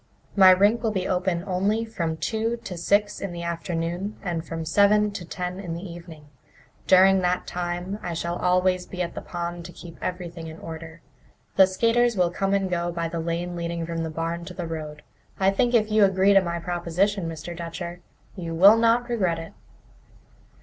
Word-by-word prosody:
My 190 -2 +8
rink 205 +5 +5
will 225 - +1
be 190 -3 -2
open 180 -2 0
only 200 +4 0
from 170 -8 -3
two 225 +5 -1
to 180 - -6
six 205 +4 +1
in 195 -3 -4
the 170 0 -6
afternoon 170 +3 -3
and 170 -4 -2
from 165 -1 -5
seven 205 +5 +4
to 200 -3 -6
ten 180 +2 -5
in 175 -4 -5
the 170 - -7
evening. 170 -3 -11 0.6
During 190 +1 +6
that 180 0 0
time 175 +3 -4
I 175 -1 -4
shall 170 +1 -2
always 180 0 +1
be 180 -1 -3
at 170 - -5
the - - -6
pond 175 0 -5
to 175 - -8
keep 170 -1 -12
everything 175 -2 -5
in 160 0 -9
order. 165 0 -9 0.5
The 190 -1 +7
skaters 230 +4 +2
will 175 -2 +2
come 195 +2 0
and 195 -1 0
go 175 -1 -1
by 170 -1 -3
the 170 - -4
lane 170 +2 -3
leading 170 -1 -3
from 165 0 -3
the 160 - -2
barn 165 +2 -3
to - - -9
the 175 - -4
road. 155 -2 -6 0.4
I 190 0 +4
think 240 +5 +1
that 235 - +6
if 215 0 -8
you 215 -1 +5
agree 195 +1 +4
to 195 - +6
my 170 -2 -3
proposition, 175 +2 -1
Mr. 165 +2 -7
Dutcher, 170 +1 -6 0.4
you 170 -4 -5
will 200 +6 +8
not 230 +1 +3
regret 190 -9 0
it." 165 0 -8
180 Hz, 200 wpm, -25 LUFS, 170-195 Hz, 0.6 s, My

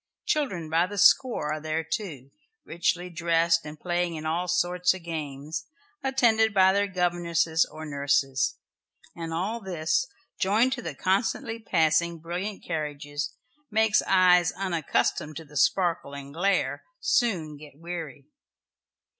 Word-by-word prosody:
Children 195 - -1
by 165 +3 +2
the 205 +2 -7
score 190 - +4
are 155 - -3
there 155 +1 -2
too 150 - -5 0.3
richly 175 +1 -1
dressed 165 -1 +2
and 150 0 -9
playing 175 -1 -1
at 155 - -7
all 170 +3 -1
sorts 180 +1 +2
of 185 - -10
games, 155 0 -5 0.3
attended 225 -5 +3
by 190 0 +6
their 200 +1 +2
governesses 170 -3 +1
or 155 +1 -8
nurses, 140 -3 +1 0.6
and 165 -1 -5
all 195 +8 -2
this, 180 - 0 0.3
joined 220 +7 +3
to 255 - -4
the 160 -10 -6
constantly 215 - 0
passing 170 -4 +2
brilliant 180 +5 -5
carriages, 145 -2 -4 0.3
makes 220 -1 +3
eyes 180 -2 +5
unaccustomed 165 -4 -1
to 160 - -8
the 150 0 -17
sparkle 175 - +1
and 140 0 -9
glare 195 +5 0 0.2
soon 180 - +1
get 145 -1 -13
weary. 165 -5 -7
170 Hz, 135 wpm, -27 LUFS, 155-190 Hz, 0.6 s, by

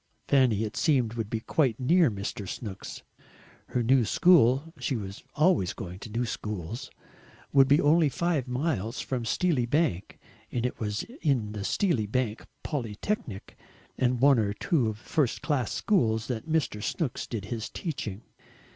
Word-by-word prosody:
Fanny, 125 -6 +3
it 110 0 -4
seemed, 130 -8 +2
would 115 -3 -3
be 110 0 -2
quite 130 -3 +1
near 165 +4 +4
Mr. 100 -1 -5
Snooks. 100 -5 -7 0.6
Her 125 - -1
new 130 +1 +4
school 150 - +4
she 135 - -1
was 100 -3 -6
always 155 - +3
going 90 -4 -7
to 110 - -9
new 115 +3 -1
schools 105 - -5 0.6
would 135 -1 +6
be 145 +3 +5
only 155 +1 +4
five 155 -2 -1
miles 125 - -2
from 125 -3 -3
Steely 140 -2 +1
Bank, 125 - 0 0.3
and 120 -1 -1
it 125 - -3
was 105 -1 -2
in 140 - -1
the 105 -2 -5
Steely 140 - +1
Bank 115 0 -2 0.2
Polytechnic, 120 - -4 0.4
and 125 -1 +1
one 135 -1 +5
or 100 -2 0
two 125 - +1
first 125 +4 -1
class 140 -6 0
schools, 110 - +1
that 125 +6 -4
Mr. 155 -10 0
Snooks 130 - -2
did 110 -5 -4
his 110 0 -4
teaching. 120 - -5
125 Hz, 155 wpm, -28 LUFS, 110-145 Hz, 0.6 s, would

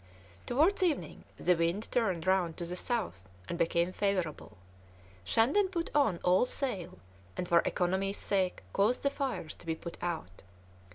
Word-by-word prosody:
Towards 320 +11 +3
evening 345 -5 -1
the 180 - +3
wind 170 +6 0
turned 190 -9 +1
round 185 -3 +2
to 170 - -3
the 175 +1 -3
south, 180 - -2 0.2
and - - -3
became 170 +2 +1
favourable; 180 - -2 0.7
Shandon 270 - +3
put 345 -3 -3
on 245 -12 +3
all 185 +7 +4
sail, 190 -11 -3 0.4
and 180 - -2
for 170 -1 +5
economy's 190 +2 0
sake 190 -3 0
caused 210 +5 +2
the 280 - +2
fires 265 - -3
to - - -14
be 160 - 0
put 170 +1 -8
out. 160 - -4
185 Hz, 155 wpm, -31 LUFS, 170-245 Hz, 0.7 s, for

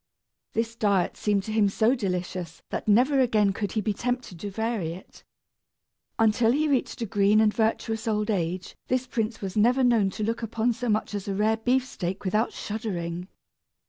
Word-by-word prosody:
This 230 0 -1
diet 200 -5 +1
seemed 205 -2 0
to 220 - -5
him 215 -2 +3
so 220 +5 +3
delicious 180 - -3
that - - -4
never 255 +7 +4
again 215 -6 +3
could 205 -2 -3
he 220 - 0
be 210 0 0
tempted 245 -5 -3
to 205 - -4
vary 215 -5 -2
it. 185 - -13 0.9
Until 225 +1 +3
he 300 +4 +2
reached 265 -3 0
a - - -1
green 205 0 +3
and 215 -1 +4
virtuous 225 0 -1
old 210 0 0
age 180 -1 -2
this 255 0 0
prince 225 -2 -2
was 190 -2 -4
never 245 +5 +4
known 230 -5 +4
to 210 - -5
look 230 +3 -1
upon 230 +1 0
so 245 +1 -3
much 215 0 0
as 205 -1 -4
a 195 - -1
rare 215 +2 +2
beefsteak 225 -6 -1
without 210 +5 +1
shuddering! 180 -5 -4
215 Hz, 180 wpm, -26 LUFS, 195-230 Hz, 0.9 s, never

